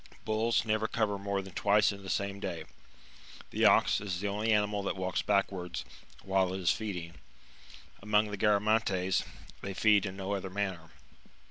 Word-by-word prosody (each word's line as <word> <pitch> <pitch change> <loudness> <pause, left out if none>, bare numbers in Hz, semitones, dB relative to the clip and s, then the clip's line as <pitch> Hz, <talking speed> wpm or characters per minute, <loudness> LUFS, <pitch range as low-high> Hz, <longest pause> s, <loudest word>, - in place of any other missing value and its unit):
Bulls 110 +2 +1
never 110 0 +1
cover 105 -3 -1
more 100 0 -2
than 95 -2 -11
twice 105 +1 +3
in 100 -1 -9
the 95 - -8
same 100 0 -2
day. 85 -4 -4 0.9
The - - +1
ox - - +5
is 95 -4 -3
the 100 - -2
only 105 +3 0
animal 105 -1 +2
that 100 - -2
walks 95 -1 -1
back 100 -1 +2
wards 90 -2 -5 0.4
while 95 -1 +1
it - - -3
is 90 -1 +3
feeding; 90 -6 -4 0.9
among 105 +1 +2
the 105 - -4
Garamantes, 100 -3 +2 0.4
they 100 -1 -5
feed 105 -2 +4
in 95 0 -7
no 95 0 -4
other 95 -1 -3
manner. 95 -4 -3
100 Hz, 170 wpm, -31 LUFS, 95-105 Hz, 0.9 s, ox